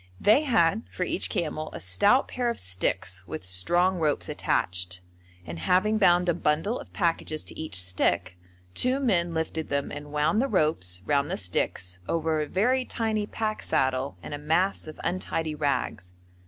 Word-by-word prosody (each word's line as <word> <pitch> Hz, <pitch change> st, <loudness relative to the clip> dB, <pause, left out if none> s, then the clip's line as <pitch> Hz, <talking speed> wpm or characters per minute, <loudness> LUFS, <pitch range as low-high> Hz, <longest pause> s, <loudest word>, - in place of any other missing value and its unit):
They 215 Hz, -, +5 dB
had 220 Hz, -, +3 dB
for 180 Hz, -, -2 dB
each 180 Hz, -, -1 dB
camel 155 Hz, -1 st, -2 dB
a -, -, -6 dB
stout 200 Hz, -, +3 dB
pair 245 Hz, -1 st, -1 dB
of 235 Hz, -, -2 dB
sticks 95 Hz, 0 st, -1 dB
with 90 Hz, -, -6 dB
strong 175 Hz, -, +2 dB
ropes 150 Hz, -3 st, 0 dB
attached, 90 Hz, 0 st, -1 dB, 0.4 s
and 80 Hz, 0 st, -6 dB
having 210 Hz, -, +2 dB
bound 180 Hz, -2 st, +4 dB
a 175 Hz, -, +3 dB
bundle 165 Hz, +8 st, 0 dB
of -, -, -11 dB
packages 165 Hz, -4 st, -1 dB
to -, -, -8 dB
each 160 Hz, -9 st, -4 dB
stick, 90 Hz, 0 st, +1 dB, 0.4 s
two 255 Hz, -, +1 dB
men 175 Hz, -10 st, +1 dB
lifted 160 Hz, 0 st, -2 dB
them 140 Hz, 0 st, -1 dB
and 145 Hz, 0 st, -8 dB
wound 150 Hz, +9 st, +2 dB
the 270 Hz, -, +1 dB
ropes 120 Hz, -, +1 dB
round 140 Hz, +2 st, +1 dB
the -, -, -2 dB
sticks 90 Hz, 0 st, -2 dB
over 160 Hz, -1 st, +1 dB
a 150 Hz, -, -2 dB
very 250 Hz, -, +2 dB
tiny 220 Hz, -4 st, -2 dB
pack 215 Hz, -1 st, -2 dB
saddle 130 Hz, +1 st, 0 dB
and -, -, -7 dB
a 145 Hz, -, -4 dB
mass 165 Hz, +5 st, +1 dB
of 155 Hz, -, -9 dB
untidy 165 Hz, -3 st, -2 dB
rags. 140 Hz, -, -2 dB
160 Hz, 170 wpm, -27 LUFS, -, 0.4 s, They